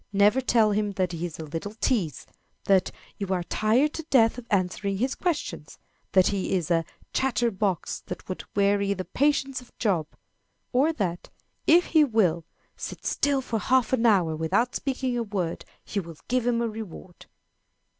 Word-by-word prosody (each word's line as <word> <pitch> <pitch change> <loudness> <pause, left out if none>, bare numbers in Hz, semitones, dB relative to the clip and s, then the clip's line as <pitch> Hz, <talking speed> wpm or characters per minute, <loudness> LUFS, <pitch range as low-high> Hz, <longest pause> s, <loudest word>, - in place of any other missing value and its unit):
Never 205 +6 +4
tell 230 -4 +3
him 205 0 0
that 185 -2 0
he 170 0 -3
is 160 - -10
"a 160 - -6
little 165 +8 -5
tease" 200 - -1 0.4
that 190 -2 +3 0.3
"you 200 - -2
are 185 -2 0
tired 230 - +2
to 325 - -5
death 230 -2 +4
of 235 - -12
answering 195 0 0
his 255 +6 0
questions" 345 -5 -3 0.4
that 185 -1 +5
he 195 -1 -1
is 175 -2 -1
"a 165 -1 +3 0.3
chatter 240 -3 +1
box 190 -4 -1
that - - -7
would 185 - -5
weary 200 0 +2
the 185 -1 -5
patience 275 -2 +1
of 250 - -20
Job;" 180 -9 +1 0.7
or 275 +6 +4
that, 185 - -3 0.4
if 345 +3 +6
he 315 -2 +7
will 190 - +2 0.3
"sit - - -7
still 280 -2 +1
for 230 -3 -2
half 255 +1 +2
an 240 -2 +3
hour, 180 -7 +3
without 160 +10 +1
speaking 260 -2 -1
a 240 - 0
word, 195 -6 -3 0.2
you 200 - -1
will 165 -3 -11
give 250 -1 0
him 235 -1 +2
a - - 0
reward." 210 -5 -9
210 Hz, 175 wpm, -26 LUFS, 185-250 Hz, 0.7 s, he